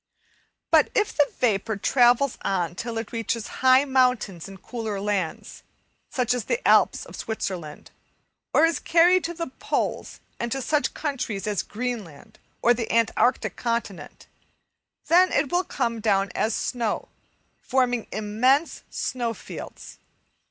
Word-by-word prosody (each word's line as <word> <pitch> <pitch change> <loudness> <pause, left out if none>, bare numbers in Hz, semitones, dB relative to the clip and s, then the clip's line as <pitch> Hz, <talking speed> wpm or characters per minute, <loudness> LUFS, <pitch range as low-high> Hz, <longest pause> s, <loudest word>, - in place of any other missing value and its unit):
But - - +5
if 420 -1 +1
the 290 -2 +3
vapour 220 -2 +1
travels 245 +4 +3
on 175 -4 -1
till 225 +5 -5
it 225 -1 -5
reaches 230 -1 -2 0.2
high 260 +1 +6
mountains 250 - +1
in 195 0 -10
cooler 220 -2 -5
lands, 195 -5 -3 0.5
such 245 -3 0
as 245 -4 -3
the - - -1
Alps - - +4
of - - -11
Switzerland; 180 -8 -5 0.6
or 320 - +5
is 330 -3 0
carried 350 +2 +4
to 345 +1 -4
the 335 0 -3
poles - - -2 0.2
and 235 0 -3
to 270 - -2
such 295 +3 0
countries 255 -9 -3
as 210 -3 0
Greenland 215 - -6 0.2
or 240 - +6
the 230 -2 -4
Antarctic 230 +2 +1
Continent, 230 -6 -4 0.8
then 365 +2 +5
it 280 -1 +1
will 355 +1 +2
come 235 -8 -2
down 200 -3 +1
as 220 0 0
snow, 235 -4 -2 0.5
forming 245 -3 0
immense 230 +9 +1
snow 235 -3 -3
fields. - - -10
235 Hz, 140 wpm, -25 LUFS, 210-265 Hz, 0.8 s, high